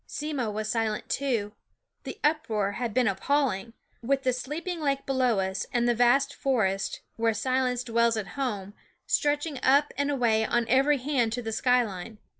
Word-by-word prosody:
Simmo 290 -6 -3
was 215 +1 -3
silent 220 -2 -1
too; 235 -7 -1 0.5
the - - -7
uproar 225 -10 +1
had 235 +2 -3
been 245 +2 +2
appalling, 230 0 0 0.3
with 270 +3 0
the 255 - +2
sleeping 325 +8 -4
lake 275 -2 0
below 255 -5 +1
us, 190 0 -2
and 240 0 +1
the 240 - +4
vast 260 +4 +3
forest, 215 -8 0 0.2
where 225 -1 +1
silence 250 +1 0
dwells 235 -1 +2
at 200 -3 -4
home, 205 -8 -3 0.3
stretching 290 -1 0
up 280 +3 +4
and 285 0 +1
away 235 -6 +2
on 235 +1 0
every 275 +4 +4
hand 255 -4 0
to 245 0 -3
the 225 - -3
sky 250 +2 +3
line. 210 +1 -7
245 Hz, 170 wpm, -27 LUFS, 220-275 Hz, 0.5 s, the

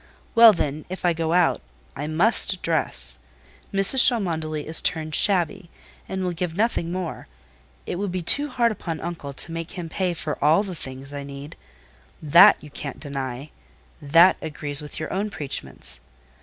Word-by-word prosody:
Well, 230 -1 +9
then, 155 -5 -3
if 185 0 -6
I 175 - +3
go 165 -1 -2
out, 175 -1 +2 0.3
I 150 - -5
must 185 +3 +1
dress. 65 - -1 0.5
Mrs. 195 +6 +6
Cholmondeley 160 - -3
is 160 +1 +3
turned 155 -1 -2
shabby, 180 -2 +2 0.4
and 190 0 -3
will 180 - -1
give 175 0 -4
nothing 205 -6 0
more; 180 -2 -5 0.6
it - - -4
would 200 0 -3
be 180 -1 -4
too 285 - +3
hard 235 -3 +1
upon 165 -6 -5
uncle 165 -4 -6
to 165 - -4
make 165 0 -6
him 175 -3 -7
pay 180 +1 -2
for 155 -3 -5
all 160 +7 +4
the 195 -3 -6
things 135 -2 -8
I 145 - -5
need: 140 +1 -10 0.6
that 150 -2 +6
you 150 - -12
can't 140 -1 -7
deny—that 140 +4 -1
agrees 150 -2 -2
with 150 - -8
your 155 - -5
own 200 +3 -2
preachments. 145 -8 -6
165 Hz, 165 wpm, -23 LUFS, 150-185 Hz, 0.6 s, Well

